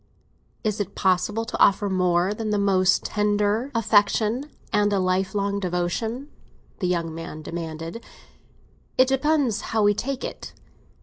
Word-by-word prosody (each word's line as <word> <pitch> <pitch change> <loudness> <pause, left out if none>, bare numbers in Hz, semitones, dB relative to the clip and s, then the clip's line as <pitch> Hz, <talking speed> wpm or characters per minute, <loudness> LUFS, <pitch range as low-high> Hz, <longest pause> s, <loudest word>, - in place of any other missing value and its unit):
"Is 215 -2 -1
it 200 -1 -4
possible 205 +4 +1
to - - -5
offer 200 +1 +4
more 180 0 +2
than 215 0 -4
the 210 - +1
most 190 -2 +3
tender 210 +3 +1
affection 220 +4 +2 0.2
and 205 0 +3
a 200 - +2
lifelong 190 +2 0
devotion?" 200 - -2 0.5
the 185 - 0
young 170 -2 -1
man 165 -1 -7
demanded. 165 +5 -6 0.9
"It 255 - +6
depends 270 -5 +1
how 220 -1 0
we 205 0 +5
take 265 +5 -3
it. - - -7
205 Hz, 135 wpm, -24 LUFS, 185-225 Hz, 0.9 s, It